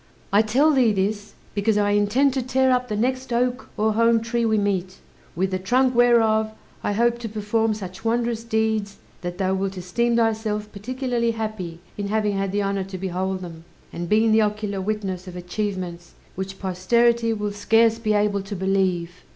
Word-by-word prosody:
I 205 Hz, -, +6 dB
tell 260 Hz, +8 st, +3 dB
thee 255 Hz, -6 st, +4 dB
this, 205 Hz, +1 st, -2 dB, 0.2 s
because 210 Hz, +1 st, +1 dB
I 205 Hz, 0 st, +2 dB
intend 210 Hz, +7 st, +3 dB
to 265 Hz, -, 0 dB
tear 260 Hz, +1 st, +2 dB
up 250 Hz, 0 st, +1 dB
the 215 Hz, -, -3 dB
next 255 Hz, +3 st, -1 dB
oak 245 Hz, +2 st, 0 dB
or 215 Hz, +1 st, +2 dB
holm 230 Hz, +1 st, +4 dB
tree 230 Hz, +1 st, -1 dB
we 220 Hz, -1 st, +2 dB
meet; 190 Hz, -3 st, -1 dB, 0.4 s
with 190 Hz, +2 st, 0 dB
the 185 Hz, -, -1 dB
trunk 250 Hz, +7 st, +2 dB
whereof 225 Hz, -3 st, +4 dB, 0.3 s
I 205 Hz, -, 0 dB
hope 235 Hz, +2 st, +2 dB
to 230 Hz, -2 st, -5 dB
perform 215 Hz, +1 st, 0 dB
such 190 Hz, -2 st, -8 dB
wondrous 230 Hz, 0 st, 0 dB
deeds 220 Hz, -3 st, -1 dB, 0.2 s
that 175 Hz, 0 st, -5 dB
thou 190 Hz, -1 st, 0 dB
wilt 190 Hz, 0 st, -2 dB
esteem 235 Hz, +7 st, 0 dB
thyself 215 Hz, -2 st, 0 dB
particularly 245 Hz, +2 st, -2 dB
happy 190 Hz, -7 st, -5 dB, 0.2 s
in 200 Hz, -, -2 dB
having 210 Hz, -1 st, 0 dB
had 195 Hz, -1 st, -1 dB
the 205 Hz, +1 st, 0 dB
honour 195 Hz, -1 st, -1 dB
to 190 Hz, 0 st, -7 dB
behold 190 Hz, 0 st, -2 dB
them, 165 Hz, -2 st, -9 dB, 0.3 s
and 170 Hz, 0 st, -5 dB
been 220 Hz, +1 st, +4 dB
the 220 Hz, 0 st, +5 dB
ocular 210 Hz, -2 st, -1 dB
witness 190 Hz, -2 st, -3 dB
of 180 Hz, -, -8 dB
achievements 180 Hz, -1 st, -4 dB, 0.2 s
which 190 Hz, +1 st, -5 dB
posterity 230 Hz, +5 st, +2 dB
will 210 Hz, -2 st, -2 dB
scarce 225 Hz, +2 st, +3 dB
be 215 Hz, -2 st, 0 dB
able 205 Hz, -1 st, +1 dB
to 195 Hz, +1 st, -6 dB
believe." 185 Hz, -2 st, 0 dB
210 Hz, 185 wpm, -23 LUFS, 190-230 Hz, 0.4 s, I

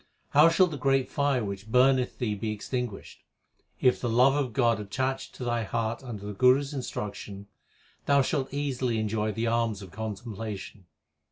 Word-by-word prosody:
How 150 Hz, +3 st, +6 dB
shall 175 Hz, +3 st, +5 dB
the 155 Hz, -5 st, -5 dB
great 135 Hz, 0 st, +2 dB
fire 140 Hz, -5 st, +1 dB
which 100 Hz, +1 st, -6 dB
burneth 130 Hz, 0 st, +3 dB
thee 115 Hz, -5 st, -1 dB
be 105 Hz, +2 st, -3 dB
ex 105 Hz, -1 st, -7 dB
tinguished? 125 Hz, -6 st, -4 dB, 0.6 s
If 125 Hz, -, +3 dB
the 120 Hz, -, -1 dB
love 125 Hz, +4 st, +5 dB
of 140 Hz, -4 st, 0 dB
God 115 Hz, -1 st, +2 dB
attach 130 Hz, +6 st, -3 dB
to -, -, -8 dB
thy 120 Hz, -1 st, 0 dB
heart 115 Hz, +3 st, -2 dB
under 110 Hz, -6 st, -7 dB
the 105 Hz, -, -5 dB
Guru 125 Hz, +6 st, +5 dB
s 140 Hz, +1 st, -6 dB
instruction, 105 Hz, -6 st, -5 dB, 0.6 s
Thou 140 Hz, -1 st, +5 dB
shalt 135 Hz, -1 st, -1 dB
easily 130 Hz, -4 st, -1 dB
enjoy 110 Hz, 0 st, -1 dB
the 115 Hz, +3 st, -2 dB
alms 115 Hz, -3 st, 0 dB
of 95 Hz, -, -11 dB
contemplation. 105 Hz, -3 st, -6 dB
120 Hz, 175 wpm, -28 LUFS, 105-135 Hz, 0.6 s, How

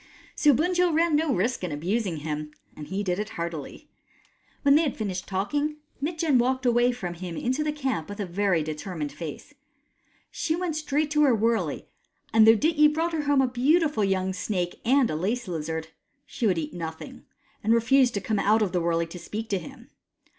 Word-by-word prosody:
So 300 Hz, -, +4 dB
Bunjil 350 Hz, +4 st, +2 dB
ran 330 Hz, -1 st, +3 dB
no 310 Hz, 0 st, +2 dB
risk 220 Hz, +3 st, 0 dB
in 180 Hz, -, -2 dB
abusing 180 Hz, +4 st, -1 dB
him, 150 Hz, 0 st, -4 dB, 0.3 s
and 150 Hz, -, -9 dB
he 195 Hz, +2 st, -2 dB
did 180 Hz, -1 st, -1 dB
it 210 Hz, 0 st, -3 dB
heartily. 170 Hz, -, -6 dB, 0.8 s
When 280 Hz, -1 st, +6 dB
they 300 Hz, -, +6 dB
had 295 Hz, -5 st, -1 dB
finished 190 Hz, -5 st, -3 dB
talking, 290 Hz, +11 st, -1 dB, 0.3 s
Mitjen 310 Hz, -3 st, +1 dB
walked 260 Hz, +1 st, 0 dB
away 240 Hz, 0 st, +4 dB
from 190 Hz, -8 st, -5 dB
him 175 Hz, -1 st, -7 dB
into 260 Hz, +5 st, -1 dB
the 300 Hz, -, 0 dB
camp 265 Hz, -, -3 dB
with 205 Hz, +1 st, -7 dB
a 205 Hz, -, -1 dB
very 180 Hz, -2 st, +1 dB
determined 155 Hz, 0 st, -5 dB
face. 165 Hz, -, -8 dB, 0.8 s
She 320 Hz, -2 st, -1 dB
went 345 Hz, -3 st, -2 dB
straight 300 Hz, -1 st, -1 dB
to 300 Hz, 0 st, +3 dB
her 270 Hz, -5 st, +5 dB
wurley, 225 Hz, +1 st, 0 dB, 0.5 s
and 220 Hz, 0 st, +6 dB
though 225 Hz, 0 st, +8 dB
Dityi 300 Hz, +2 st, +4 dB
brought 330 Hz, +2 st, -1 dB
her 305 Hz, -2 st, -1 dB
home 285 Hz, -1 st, +4 dB
a -, -, +2 dB
beautiful 285 Hz, +1 st, +2 dB
young 190 Hz, -1 st, 0 dB
snake 185 Hz, -2 st, -3 dB
and 260 Hz, +1 st, +4 dB
a -, -, -2 dB
lace 215 Hz, +8 st, -2 dB
lizard, 160 Hz, -1 st, -4 dB, 0.4 s
she 240 Hz, -, -2 dB
would 185 Hz, -4 st, +2 dB
eat 155 Hz, -2 st, -4 dB
no 165 Hz, -2 st, -3 dB
thing 160 Hz, -, -12 dB, 0.4 s
and 220 Hz, -, +1 dB
refused 245 Hz, +2 st, +4 dB
to 200 Hz, -, -1 dB
come 210 Hz, +2 st, -1 dB
out 215 Hz, +2 st, +3 dB
of 195 Hz, -, -1 dB
the 180 Hz, -, 0 dB
wurley 170 Hz, 0 st, +1 dB
to 165 Hz, +2 st, -9 dB
speak 215 Hz, +6 st, -6 dB
to 195 Hz, -, 0 dB
him. 255 Hz, +2 st, -12 dB
220 Hz, 200 wpm, -26 LUFS, 180-290 Hz, 0.8 s, though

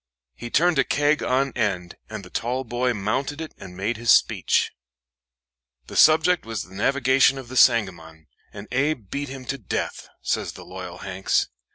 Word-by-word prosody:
He 120 Hz, -, -8 dB
turned 165 Hz, +3 st, +3 dB
a -, -, +5 dB
keg 145 Hz, +1 st, +1 dB
on 135 Hz, +2 st, +1 dB
end, 95 Hz, -7 st, -1 dB, 0.2 s
and -, -, -7 dB
the -, -, -14 dB
tall 125 Hz, +3 st, -2 dB
boy 125 Hz, +1 st, -1 dB
mounted 125 Hz, +8 st, -2 dB
it 160 Hz, -1 st, -6 dB
and 90 Hz, -2 st, -10 dB
made 105 Hz, +4 st, -2 dB
his 115 Hz, 0 st, +2 dB
speech. -, -, +3 dB, 1.1 s
"The -, -, -10 dB
subject 160 Hz, +3 st, +5 dB
was 115 Hz, -2 st, -4 dB
the 90 Hz, -, -16 dB
navigation 135 Hz, +5 st, +3 dB
of 130 Hz, -3 st, -9 dB
the 130 Hz, -, -8 dB
Sangamon, 85 Hz, -11 st, +2 dB, 0.3 s
and 100 Hz, +1 st, -10 dB
Abe 130 Hz, -5 st, -1 dB
beat 145 Hz, 0 st, -3 dB
him 130 Hz, -1 st, -8 dB
to 135 Hz, +3 st, -4 dB
death," 100 Hz, -, -4 dB
says -, -, -1 dB
the -, -, -11 dB
loyal -, -, -8 dB
Hanks. 95 Hz, 0 st, -1 dB
125 Hz, 175 wpm, -24 LUFS, 100-140 Hz, 1.1 s, a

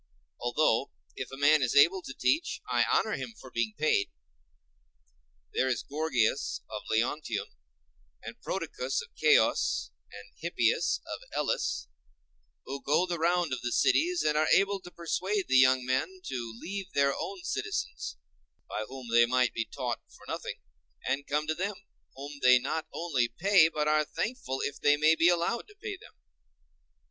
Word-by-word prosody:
Although, 120 Hz, 0 st, +1 dB, 0.3 s
if 130 Hz, -, -5 dB
a 135 Hz, -, -7 dB
man 145 Hz, +2 st, +5 dB
is 125 Hz, -1 st, 0 dB
able 170 Hz, +7 st, +6 dB
to 135 Hz, -, -8 dB
teach, 330 Hz, +3 st, 0 dB
I -, -, +2 dB
honor -, -, +2 dB
him 230 Hz, -, -4 dB
for 130 Hz, -, -12 dB
being 115 Hz, -2 st, -1 dB
paid. 150 Hz, -9 st, +2 dB, 1.4 s
There 130 Hz, -, +1 dB
is 125 Hz, -4 st, -1 dB
Gorgias 140 Hz, -5 st, 0 dB
of 105 Hz, -1 st, -4 dB
Leontium, 115 Hz, +1 st, -1 dB, 0.7 s
and -, -, -9 dB
Prodicus -, -, -3 dB
of -, -, -14 dB
Ceos, 65 Hz, -, +3 dB, 0.2 s
and 100 Hz, 0 st, -12 dB
Hippias 120 Hz, -9 st, +1 dB
of -, -, -6 dB, 0.2 s
Elis, 65 Hz, -, -1 dB, 0.8 s
who 135 Hz, +1 st, -5 dB
go 150 Hz, +5 st, +2 dB
the 175 Hz, -2 st, -3 dB
round 170 Hz, -2 st, +1 dB
of 130 Hz, -, -3 dB
the 120 Hz, -, -2 dB
cities, 350 Hz, -, +2 dB
and 150 Hz, -, +2 dB
are 155 Hz, +1 st, +3 dB
able 195 Hz, 0 st, +4 dB
to 180 Hz, -, -11 dB
persuade 185 Hz, +4 st, -2 dB
the 130 Hz, -, +4 dB
young 130 Hz, -1 st, +5 dB
men 145 Hz, +9 st, -1 dB
to 120 Hz, -6 st, -5 dB
leave 195 Hz, 0 st, -6 dB
their 140 Hz, 0 st, +3 dB
own 370 Hz, -3 st, -5 dB
citizens, 425 Hz, +3 st, -3 dB, 0.5 s
by 110 Hz, -, -4 dB
whom 130 Hz, -2 st, -9 dB
they 120 Hz, 0 st, +6 dB
might 125 Hz, 0 st, +2 dB
be 115 Hz, -, -2 dB
taught 125 Hz, -3 st, -4 dB
for -, -, -17 dB
nothing, -, -, -5 dB, 0.5 s
and 140 Hz, +1 st, -1 dB
come 150 Hz, +1 st, 0 dB
to 155 Hz, -, 0 dB
them, 195 Hz, +5 st, -3 dB, 0.4 s
whom 140 Hz, +1 st, -8 dB
they 125 Hz, 0 st, +7 dB
not 140 Hz, +6 st, -3 dB
only 145 Hz, -8 st, 0 dB
pay, 165 Hz, -, +4 dB
but 150 Hz, -2 st, -1 dB
are 155 Hz, 0 st, +3 dB
thankful 150 Hz, -, -3 dB
if 145 Hz, -, -3 dB
they 145 Hz, 0 st, +4 dB
may 155 Hz, +2 st, +5 dB
be 165 Hz, +2 st, +4 dB
allowed 175 Hz, +7 st, 0 dB
to 415 Hz, -, -18 dB
pay 420 Hz, -2 st, -5 dB
them. -, -, -16 dB
145 Hz, 165 wpm, -29 LUFS, 125-180 Hz, 1.4 s, they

